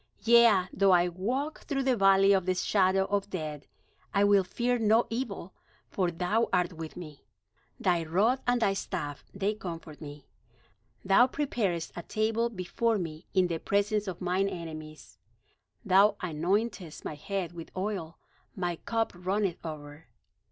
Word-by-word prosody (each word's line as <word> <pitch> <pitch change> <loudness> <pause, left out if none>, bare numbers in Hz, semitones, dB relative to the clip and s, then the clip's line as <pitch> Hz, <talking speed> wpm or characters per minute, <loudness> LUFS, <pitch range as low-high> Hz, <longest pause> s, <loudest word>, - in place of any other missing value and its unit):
Yea, 230 -4 +6
though 195 0 +3
I 175 0 +4
walk 250 - -3
through 275 -2 -1
the 260 -1 +2
valley 195 -1 +5
of 190 -2 +1
the 185 - +2
shadow 190 0 +2
of 200 0 -1
death, 155 -6 -5 0.5
I 200 - +4
will 205 -1 +5
fear 240 +6 -1
no 225 +1 +4
evil; 225 -6 -4 0.4
for 185 -3 0
thou 180 +7 0
art 180 -1 +1
with 160 0 -8
me; 155 -5 -10 0.6
Thy 175 -2 +1
rod 205 +11 +1
and 245 0 +3
thy 195 - +3
staff, 145 -6 -4
they 200 +2 -1
comfort 165 -7 -8
me. 145 -2 -9 0.8
Thou 195 +6 +6
preparest 210 - -2
a 175 - -5
table 220 +5 0
before 220 +3 -1
me 165 -3 -6
in 185 -1 +5
the 170 -2 -2
presence 205 +2 0
of 185 -1 -5
mine 185 +2 +1
enemies; 155 -3 -9 0.7
Thou 200 +2 +5
anointest 180 +2 -2
my - - -3
head 180 +3 -4
with 170 -1 -9
oil; 185 -4 -3 0.4
my 175 -3 -2
cup 225 +4 -2
runneth 185 +1 -2
over. 150 -2 -8
190 Hz, 150 wpm, -29 LUFS, 170-215 Hz, 0.8 s, Yea